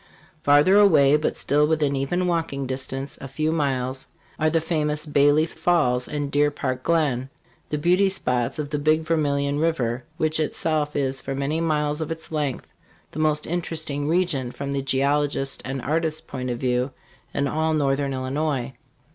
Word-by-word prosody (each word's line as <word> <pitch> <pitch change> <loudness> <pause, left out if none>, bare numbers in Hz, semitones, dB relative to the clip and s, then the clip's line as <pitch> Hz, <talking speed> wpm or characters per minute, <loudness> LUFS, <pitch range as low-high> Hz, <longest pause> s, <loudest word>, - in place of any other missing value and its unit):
Farther 145 +7 +5
away, 150 -8 +6
but 150 - 0
still 150 +1 +2
within 150 -3 +1
even 155 +7 0
walking 165 -6 -1
distance 135 +1 -4
a 135 - -6
few 155 +4 -1
miles 130 -4 -1 0.3
are 155 - +3
the 165 +1 +2
famous 150 -2 -1
Bailey's 145 +2 +3
Falls 160 -7 +1
and 145 -1 -3
Deer 145 +1 +3
Park 130 -3 -3
Glen, 135 -5 +1 0.4
the 150 - -1
beauty 180 +6 +3
spots 125 -8 -1
of 150 -1 -4
the 150 - -1
Big 155 +2 +2
Vermilion 145 -3 0
river, 130 -7 0
which 155 0 0
itself 155 -1 -1
is 135 -1 -1
for 135 - -4
many 140 +4 -1
miles 150 -1 0
of 155 - -3
its 160 0 -7
length 145 -5 -2 0.5
the 155 - -6
most 155 -1 +1
interesting 160 -4 -2
region, 160 -7 0
from 140 +1 -5
the 140 - -1
geologist's 135 +1 0
and 135 -1 -4
artist's 155 +2 0
point 130 -1 -5
of 120 - -2
view, 125 +1 0 0.4
in 140 - 0
all 160 +2 0
northern 140 -1 +1
Illinois. 135 0 -2
145 Hz, 165 wpm, -24 LUFS, 135-155 Hz, 0.5 s, away